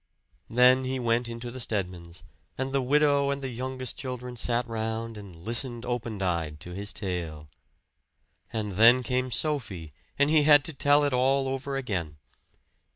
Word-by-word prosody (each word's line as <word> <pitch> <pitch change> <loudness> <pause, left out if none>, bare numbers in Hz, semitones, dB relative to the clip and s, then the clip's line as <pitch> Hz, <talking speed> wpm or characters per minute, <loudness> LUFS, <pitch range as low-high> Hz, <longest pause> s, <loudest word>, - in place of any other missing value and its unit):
Then 125 +2 +5
he 130 0 -2
went 120 -1 0
into 115 +1 -6
the 130 - -8
Stedmans, 90 -7 -4 0.3
and 130 +1 -3
the 135 - +2
widow 140 +1 +3
and 140 0 -2
the 135 - -3
youngest 130 +1 -5
children 125 -2 -6
sat 120 +1 0
round 110 0 -3
and 100 -4 -10
listened 120 +1 +1
open 120 -4 -3
eyed 80 -4 -2
to 90 - -8
his 100 +2 -1
tale. 85 -6 -3 1.0
And 110 -2 -3
then 115 +6 +6
came 130 +1 -1
Sophie, 115 - -2 0.2
and 145 +1 +3
he 155 -1 +5
had 145 -1 +6
to 160 - -3
tell 145 +1 +3
it 145 -2 +1
all 135 +2 +2
over 135 +1 -3
again. 90 - -3
120 Hz, 160 wpm, -27 LUFS, 105-135 Hz, 1.0 s, then